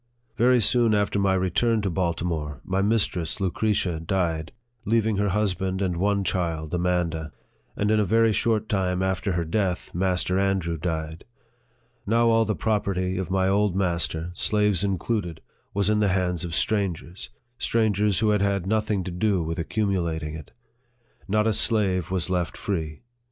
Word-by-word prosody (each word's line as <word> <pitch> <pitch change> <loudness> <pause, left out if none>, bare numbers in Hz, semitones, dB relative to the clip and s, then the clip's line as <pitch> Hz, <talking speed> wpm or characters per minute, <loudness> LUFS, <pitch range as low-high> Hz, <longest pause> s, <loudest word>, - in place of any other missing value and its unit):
Very 125 +2 +4
soon 115 -1 +3
after 100 0 +1
my 100 -1 +2
return 105 +5 +1
to 95 - 0
Baltimore, 85 -5 -2
my 95 +1 0
mistress, 100 -5 0
Lucretia, 95 -3 0
died, 80 -1 -1 0.3
leaving 110 -1 +1
her 100 0 +1
husband 95 -2 -1
and 95 -3 -1
one 100 +2 +1
child, 85 -4 -2
Amanda; 85 -3 -1 0.4
and 105 +1 0
in 110 - +3
a - - +3
very 115 +3 +3
short 110 0 +1
time 95 -3 0
after 95 +1 -1
her 85 -1 -1
death, 90 +1 -1
Master 90 +1 0
Andrew 95 -4 0
died. 80 0 -4 0.8
Now 115 +2 +3
all 115 0 +3
the 110 -1 -1
property 100 -4 -1
of 95 - -3
my 95 0 +1
old 100 -1 +2
master, 85 -3 -1
slaves 105 +1 +1
included, 95 -3 -2 0.3
was 100 -1 0
in 105 0 +2
the 105 - +3
hands 90 -3 0
of 85 -2 -3
strangers, 90 - -1 0.3
strangers 105 -3 +1
who 110 - +3
had 105 -1 +2
had 100 -2 0
nothing 105 -1 0
to 90 - -5
do 90 0 +1
with 80 +1 -3
accumu 100 +2 0
lating 80 -2 -3
it. 75 -3 -9 0.8
Not 105 +2 +2
a 110 - +2
slave 100 -6 +1
was 95 -3 -1
left 90 -5 -2
free. 80 -4 -4
95 Hz, 160 wpm, -25 LUFS, 85-105 Hz, 0.8 s, Very